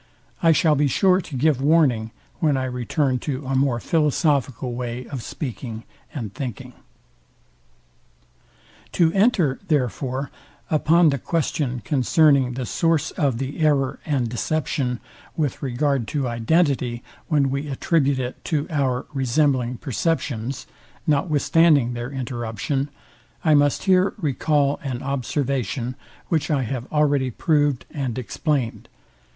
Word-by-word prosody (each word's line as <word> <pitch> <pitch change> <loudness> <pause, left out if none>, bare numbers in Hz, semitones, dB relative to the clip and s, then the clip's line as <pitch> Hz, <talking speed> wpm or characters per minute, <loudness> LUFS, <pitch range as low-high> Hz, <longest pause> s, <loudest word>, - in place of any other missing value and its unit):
I 165 - +5
shall 160 0 +4
be 145 0 +2
sure 185 +7 +3
to 150 -6 -7
give 140 0 +2
warning, 135 -7 +3 0.3
when 150 -4 +2
I 130 - -1
return 130 +1 -1
to 135 0 -4
a 135 - -2
more 130 -3 +2
philosophical 140 -4 +1
way 120 0 -4
of 130 -1 -6
speaking 115 -4 -6 0.3
and 115 -9 -6
thinking. 130 -7 -6 2.2
To 165 -2 +3
enter, 195 - +2
therefore, 135 - -1 0.4
upon 160 +2 +4
the 140 -1 -1
question 140 -5 -1
concerning 140 -2 +3
the 130 -1 -3
source 165 +4 +1
of 140 -8 0
the 135 +4 -4
error 145 -4 +2
and 135 -6 0
deception 125 0 -1 0.4
with 150 -6 -1
regard 135 -2 0
to 135 -3 0
identity, 125 0 +1 0.2
when 145 -5 +2
we 140 +2 -2
attribute 140 0 +1
it 125 -1 -5
to 150 -3 0
our 135 -4 0
resembling 130 -2 +1
perceptions, 135 -2 -2 0.4
notwithstanding 150 -3 +3
their 120 +1 -4
interruption; 130 +1 -3 0.6
I 155 - +5
must 145 -1 +3
here 185 0 +3
recal 145 -3 +1
an 130 -3 -4
observation, 130 -2 -2 0.3
which 160 -2 0
I 140 -4 +1
have 125 +1 -5
already 145 -3 +2
prov'd 145 0 +1
and 130 -6 -3
explain'd. 130 +2 -2
140 Hz, 125 wpm, -23 LUFS, 125-150 Hz, 2.2 s, I